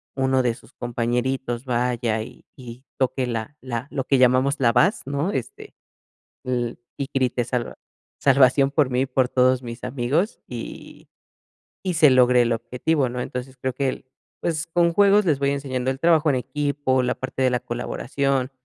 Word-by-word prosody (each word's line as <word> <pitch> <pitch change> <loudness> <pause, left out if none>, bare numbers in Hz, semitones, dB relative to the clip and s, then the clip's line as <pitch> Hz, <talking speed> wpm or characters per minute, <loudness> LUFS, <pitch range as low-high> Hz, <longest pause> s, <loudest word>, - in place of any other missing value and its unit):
uno 130 -1 +2
de 120 -2 +1
sus - - -18
compañeritos 120 +1 -2
vaya 120 -2 0
y 110 - -11
y 125 -1 -11
toque 130 -1 0
la 115 +3 -4
la 125 0 -4
lo 135 - -2
que 135 - +3
llamamos 130 +3 +3
la 120 -3 +3
base",¿no?, 155 - +1
este, 420 - -6 0.7
"y 125 +1 -4
grite 130 -2 +1
salva 120 -1 -3 0.4
salvación 135 0 +4
por 145 -3 +2
mí 125 0 0
y - - +2
por 130 -1 +1
todos 130 0 +3
mis 115 0 -8
amigos, 140 - -1
y - - -9 0.7
y 185 -2 -1
se 155 -2 +6
logre 125 -1 +5
el 120 - 0
objetivo", 125 +5 -1
¿no? 125 +1 -4
Entonces, 130 +2 -6
creo 130 0 -3
que 135 +1 0
el, 130 - -6 0.4
pues, 160 -2 -1
con 170 0 +2
juegos 205 +2 +5
les 155 -5 +2
voy 140 0 +1
enseñando 130 -2 -2
el 135 - -6
trabajo 160 -1 +3
en - - 0
equipo, 135 0 -1
la 125 0 0
parte 130 0 -5
de 130 - +3
la 125 - +1
colaboración, 130 +2 -2
130 Hz, 170 wpm, -23 LUFS, 125-140 Hz, 0.7 s, se